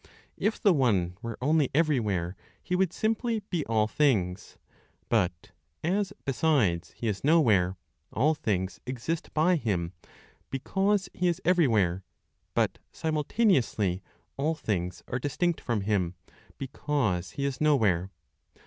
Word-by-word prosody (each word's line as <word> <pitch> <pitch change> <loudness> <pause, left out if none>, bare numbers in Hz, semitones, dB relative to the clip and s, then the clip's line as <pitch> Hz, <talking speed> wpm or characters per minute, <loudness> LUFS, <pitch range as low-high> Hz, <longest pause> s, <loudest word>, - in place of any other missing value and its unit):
If 220 - 0
the 200 - +5
One 100 - +2
were 115 -1 -5
only 150 -1 +3
everywhere, 105 - +1 0.3
He 180 - -1
would 185 -2 +2
simply 225 +1 -1
be 170 -5 0
all 110 -1 +2
things; 105 -10 0 0.5
but, 95 -3 0 0.3
as, 195 +4 0
besides, 120 - +2
He 115 - -3
is 105 -3 -2
nowhere, 110 - +4 0.3
all 150 +7 +3
things 95 - -2
exist 130 +6 -3
by 170 +3 +4
Him, 95 - -1 0.6
because 195 +8 0
He 180 - 0
is 170 -2 +1
everywhere; 110 - +3 0.5
but - - +1
simultaneously 150 - +1 0.4
all 155 +4 +1
things 90 - -3
are 125 - -2
distinct 160 +6 -1
from 115 -4 -1
Him, 95 -4 0 0.4
because 125 -10 -1
He 140 - -2
is 140 0 -3
nowhere. 105 - +3
130 Hz, 125 wpm, -28 LUFS, 95-160 Hz, 0.6 s, the